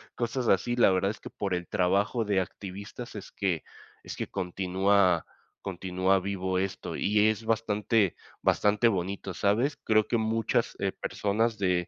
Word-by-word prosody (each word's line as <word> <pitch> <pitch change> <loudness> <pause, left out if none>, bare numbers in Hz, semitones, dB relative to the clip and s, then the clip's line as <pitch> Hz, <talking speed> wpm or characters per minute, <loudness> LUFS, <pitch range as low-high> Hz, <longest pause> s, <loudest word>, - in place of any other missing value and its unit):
cosas 120 +1 -2
así, 115 +5 +2
la 120 -5 +5
verdad 95 +2 +1
es 110 - -10
que - - -9
por 100 -2 -3
el 90 -1 -4
trabajo 100 +6 +1
de 100 -2 +2
activistas 100 +6 -8
es 100 - -8
que 90 -5 -1 0.4
es - - -7
que - - -4
continúa 95 0 +1 0.4
continúa 95 0 0
vivo 95 -1 -2
esto, 95 0 -3
y 105 +1 +3
es 110 +1 -2
bastante 110 -2 +1 0.3
bastante 105 +3 +3
bonito, 95 -1 -2
¿sabes?, 110 - +1
creo 110 -1 +3
que 120 - +1
muchas, 110 0 0
eh, - - 0
personas 110 +2 -1
de 90 -2 +1
100 Hz, 155 wpm, -28 LUFS, 95-110 Hz, 0.4 s, la